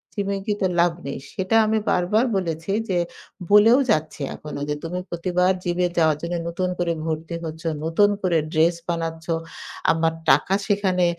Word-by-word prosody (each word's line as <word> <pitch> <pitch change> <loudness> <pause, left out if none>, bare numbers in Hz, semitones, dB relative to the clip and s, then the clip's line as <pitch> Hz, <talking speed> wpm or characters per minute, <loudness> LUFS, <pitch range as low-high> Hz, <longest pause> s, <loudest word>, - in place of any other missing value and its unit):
জিমে 200 -1 -1
গিয়ে 210 -2 -1
তো - - +4
লাভ 175 0 +4
নেই। 140 - -4 0.2
সেটা 190 +3 -1
আমি 220 +1 +1
বারবার 200 +7 +2
বলেছি 165 0 -3 0.2
যে, 185 - +1 0.5
বলেও 215 +5 +7
যাচ্ছি 155 -1 0
এখনো। 150 -1 -7
যে, 150 - 0
"তুমি 175 +2 -3
প্রতিবার 180 +1 +1
জিমে 180 0 +1
যাওয়ার 160 -3 +3
জন্য 170 +1 -3
নতুন 180 +2 -2
করে 170 -1 +1
ভর্তি 160 +1 -3
হচ্ছ, 160 0 -7 0.2
নতুন 185 +6 +4
করে 175 -3 +2
ড্রেস 165 +2 +3
বানাচ্ছ। 165 -1 -3 0.7
আমার 165 0 +1 0.2
টাকা 190 - +4
সেখানে 190 -3 +2
175 Hz, 160 wpm, -23 LUFS, 165-190 Hz, 0.7 s, বলেও